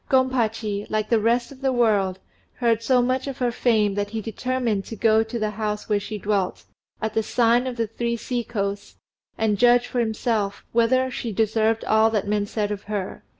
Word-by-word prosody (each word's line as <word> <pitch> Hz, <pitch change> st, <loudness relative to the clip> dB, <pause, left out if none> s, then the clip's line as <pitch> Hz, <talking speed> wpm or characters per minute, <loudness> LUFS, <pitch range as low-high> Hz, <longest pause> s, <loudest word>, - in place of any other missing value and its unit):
Gompachi, 225 Hz, -6 st, +1 dB
like 215 Hz, 0 st, -1 dB
the 230 Hz, -, +4 dB
rest 235 Hz, +4 st, +1 dB
of 270 Hz, -1 st, -13 dB
the 270 Hz, -1 st, +1 dB
world, 210 Hz, -6 st, +2 dB, 0.4 s
heard 230 Hz, -2 st, +1 dB
so 250 Hz, +1 st, +3 dB
much 255 Hz, +2 st, 0 dB
of 275 Hz, -, -5 dB
her 245 Hz, -2 st, 0 dB
fame 220 Hz, -4 st, +2 dB
that 205 Hz, 0 st, -2 dB
he 220 Hz, +1 st, -4 dB
determined 230 Hz, -1 st, -2 dB
to 225 Hz, -, -7 dB
go 220 Hz, +1 st, +3 dB
to 225 Hz, +2 st, -4 dB
the 215 Hz, -2 st, -1 dB
house 210 Hz, 0 st, -3 dB
where 210 Hz, -1 st, +2 dB
she 210 Hz, +1 st, -6 dB
dwelt, 200 Hz, -2 st, -1 dB, 0.4 s
at 220 Hz, -1 st, -2 dB
the 220 Hz, -, +2 dB
sign 240 Hz, +2 st, +2 dB
of 255 Hz, -, -3 dB
"The 230 Hz, -, +1 dB
Three 235 Hz, +2 st, -3 dB
Sea 240 Hz, +1 st, -3 dB
coasts," 200 Hz, -3 st, -4 dB, 0.4 s
and 210 Hz, -3 st, +1 dB
judge 245 Hz, 0 st, +5 dB
for 245 Hz, -, -3 dB
himself 220 Hz, -3 st, -1 dB
whether 255 Hz, +3 st, +2 dB
she 235 Hz, -2 st, -4 dB
deserved 220 Hz, +1 st, +1 dB
all 220 Hz, +1 st, +4 dB
that 210 Hz, -3 st, -1 dB
men 205 Hz, 0 st, 0 dB
said 210 Hz, -1 st, -2 dB
of 205 Hz, -1 st, -5 dB
her. 205 Hz, -3 st, -4 dB
225 Hz, 200 wpm, -23 LUFS, 210-240 Hz, 0.4 s, judge